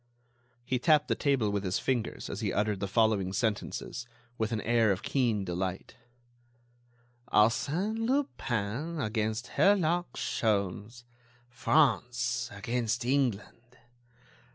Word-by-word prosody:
He 125 0 0
tapped 150 +3 +3
the - - +3
table 135 -8 +1
with 100 -1 -1
his 95 -1 0
fingers 120 -4 -2
as 100 - -5
he 105 -3 0
uttered 105 -1 0
the 100 - -2
following 105 -3 +2
sentences, 115 +2 -2 0.3
with 110 -1 -2
an 110 - -1
air 115 -1 +3
of 95 - -2
keen 115 -7 0
delight: 90 +1 -4 1.4
"Arsène 175 - +2
Lupin 155 - -1
against 110 -1 -2
Herlock 175 -6 +3
Sholmes.... 105 +2 -1 0.5
France 120 -2 +1
against 115 +3 -2
England.... 120 -2 -1
115 Hz, 110 wpm, -30 LUFS, 105-135 Hz, 1.4 s, tapped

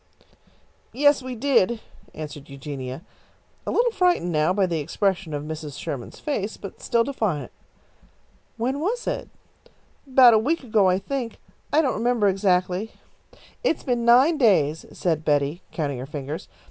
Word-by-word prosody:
"Yes, 285 +2 +4
we 255 -1 -6
did," 235 -3 +2 0.4
answered 150 -2 -8
Eugenia, 135 +1 -6 0.6
a - - 0
little 475 0 +2
frightened 360 - +2
now 155 +1 +2
by 195 0 +2
the 170 -3 -1
expression 180 +3 -1
of 145 -1 -3
Mrs. 150 -2 -6
Sherman's 130 -4 -6
face, 220 -8 -3
but 195 - -10
still 235 -1 +2
defiant. 205 - -2 1.1
"When 260 +5 -1
was 445 +10 -2
it?" - - -3 0.8
"About 255 -3 +7
a 220 - +5
week 290 +7 0
ago, 215 -5 +3
I 180 - +3
think. 240 +4 -4 0.3
I 315 +2 +4
don't 265 - +1
remember 230 -2 +1
exactly." 185 +1 +1 0.7
"It's 410 - 0
been 245 -3 0
nine 260 +7 +5
days," 160 - +3
said 160 -3 -1
Betty, 145 +2 +1
counting 145 -6 -2
her 130 - -6
fingers. 145 +1 -6
195 Hz, 145 wpm, -24 LUFS, 155-255 Hz, 1.1 s, About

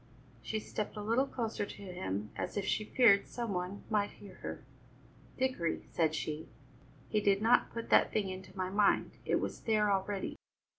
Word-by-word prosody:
She 220 - -2
stepped 215 0 -4
a 210 - -3
little 235 +6 +2
closer 225 -5 -2
to 200 - -7
him 105 - -4
as - - -3
if 200 - 0
she 215 - 0
feared 210 -5 +5
some 235 -4 -3
one 180 +2 -3
might 210 -2 +1
hear 200 -2 -13
her. - - -6 0.7
"Dickory," 255 -11 0
said 160 -2 +2
she, 155 0 -4 0.6
"he 215 - +1
did 200 -1 +4
not 225 +3 +4
put 230 0 -6
that - - +6
thing 210 -3 +1
into 185 0 -8
my 185 0 -1
mind; 205 0 +3
it - - +2
was - - -4
there 215 -2 +2
already. 195 0 -1
200 Hz, 180 wpm, -33 LUFS, 185-220 Hz, 0.7 s, that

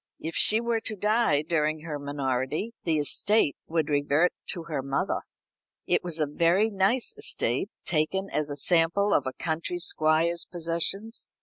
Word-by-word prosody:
If 165 +1 -5
she 215 +6 +4
were 235 -1 0
to 220 -1 -5
die 210 -7 +2
during 155 -1 0
her 155 -2 -5
minority 140 - -2
the 160 -2 +2
estate 150 +3 +3
would 160 -2 0
revert 145 +3 +2
to 170 - -2
her 155 -4 -3
mother. 135 +1 -1 0.7
It - - +1
was 175 -3 -3
a 155 - +2
very 170 +8 +2
nice 200 +6 +1
estate, 125 - 0 0.2
taken 175 +4 0
as 150 -1 -1
a 145 - -4
sample 170 +6 +2
of 135 - +2
a 130 - -3
country 165 +3 -3
squire's 165 0 +1
possessions. 175 +6 -3
165 Hz, 160 wpm, -27 LUFS, 150-195 Hz, 0.7 s, she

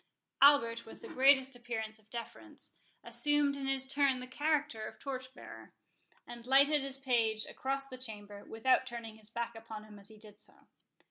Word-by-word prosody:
Albert, 230 -5 +6
with 225 - -12
the - - -7
greatest 265 0 +5
appearance 220 -3 -4
of 215 0 -26
deference, 285 +7 -7 0.3
assumed 295 -1 +2
in 275 -1 -4
his 270 -1 +2
turn 270 -1 +3
the 250 - -6
character 290 -4 0
of 220 - -10
torch 260 -2 -5
bearer, - - -11 0.5
and 240 0 -10
lighted 280 +3 +5
his 270 0 -3
page 230 -5 +1
across 275 +1 -2
the 255 -1 -9
chamber, 205 -4 -8
without 255 +4 +2
turning 230 -3 -7
his 215 -1 -12
back 235 +1 -3
upon 225 -1 -8
him 210 -1 -13
as 200 - -12
he 220 - -14
did 210 -1 -8
so. - - -14
250 Hz, 180 wpm, -34 LUFS, 220-275 Hz, 0.5 s, Albert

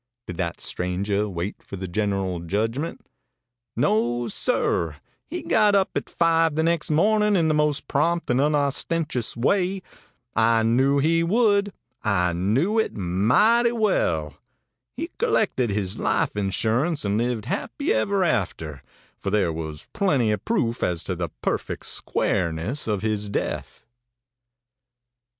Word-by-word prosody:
Did 90 - -7
that 85 -2 -3
stranger 100 +3 -1
wait 90 +2 -5
for - - -9
the 95 0 -5
general 95 -2 -1
judgment? 115 - -3 0.7
No, 120 +2 +1
sir; 85 -5 +1 0.3
he - - -5
got 210 -2 +3
up 195 -1 +2
at - - -3
five 165 -2 +2
the 160 - +1
next 165 -1 +1
morning 210 +6 +3
in 165 -4 +3
the 155 - +2
most 150 -1 +1
prompt 170 +4 0
and 125 +2 +2
unostentatious 145 -3 0
way. 185 +8 +1 0.5
I 115 0 +3
knew 130 +5 +3
he 165 +4 +3
would; 205 +1 +2 0.3
I 90 -5 +1
knew 125 - +1
it 220 - -1
mighty 125 - +3
well. 80 - 0 0.6
He 330 +5 -4
collected 220 - +1
his 100 -2 -2
life - - 0
insurance, 110 - 0
and 100 +2 +1
lived 120 -2 -1
happy 120 - -2
ever 190 - +1
after, 85 - -2 0.4
for 100 - -3
there 95 -5 +1
was 80 -2 -6
plenty 140 - +2
of 105 -2 -2
proof 115 0 0
as 85 -2 0
to 90 - -3
the 85 -1 -3
perfect - - -2
squareness 90 - -1
of 105 -2 -1
his 105 -2 -1
death. - - -4
115 Hz, 135 wpm, -24 LUFS, -, 0.7 s, got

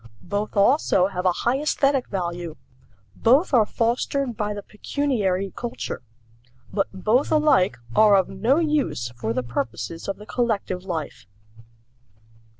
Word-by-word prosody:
Both 205 +3 -3
also 200 -4 +4
have 185 -1 -1
a - - +5
high 250 +3 +2
aesthetic 275 -3 +1
value. 175 -3 -4 0.6
Both 275 +8 +3
are 225 -4 +5
fostered 240 +2 -1
by 210 0 -2
the 205 - -6
pecuniary 205 -6 -1
culture. 240 -1 -5 0.7
But 195 -1 +1
both 215 +8 +1
alike 300 - +3 0.2
are 210 +3 +6
of 190 -2 +3
no 225 +9 +1
use 280 - 0
for 115 -2 -3
the 125 +2 -1
purposes 120 +4 -4
of 195 -1 -3
the 210 - -11
collective 215 -7 -1
life. 160 - -5
205 Hz, 135 wpm, -23 LUFS, 180-250 Hz, 0.7 s, are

